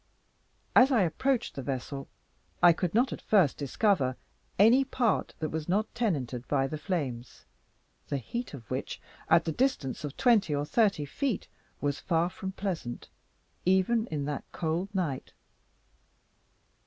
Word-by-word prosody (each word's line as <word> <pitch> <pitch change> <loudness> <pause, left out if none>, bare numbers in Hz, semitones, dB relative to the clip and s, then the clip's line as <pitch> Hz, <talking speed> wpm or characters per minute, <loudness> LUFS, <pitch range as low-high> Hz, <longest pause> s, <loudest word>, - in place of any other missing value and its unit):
As 260 +2 +7
I 230 -7 +4
approached 240 - 0
the 135 - -5
vessel, 135 +1 -4 0.6
I 175 -1 +9
could 175 +2 -2
not 245 +3 +3
at - - -8
first 190 -10 +3
discover 140 - +1 0.4
any 230 +7 +6
part 245 -5 0
that 155 - -2
was 160 +1 -4
not 210 +4 0
tenanted 135 - -2
by 135 -2 +2
the 150 +3 -4
flames, 135 - -4 0.6
the 140 - -1
heat 235 - -5
of 120 -4 -11
which, - - -3 0.3
at 165 +1 +5
the 165 - 0
distance 155 - -1
of 145 -1 -6
twenty 215 - +3
or 145 +1 -1
thirty 200 -4 +2
feet, 250 - -2 0.3
was 145 -1 -1
far 170 0 +1
from 190 +1 -6
pleasant, 170 -12 -4 0.5
even 190 +5 +2
in 145 -6 -3
that 145 -1 -3
cold 170 +3 -2
night. 155 -9 -2
170 Hz, 145 wpm, -29 LUFS, 140-215 Hz, 0.6 s, I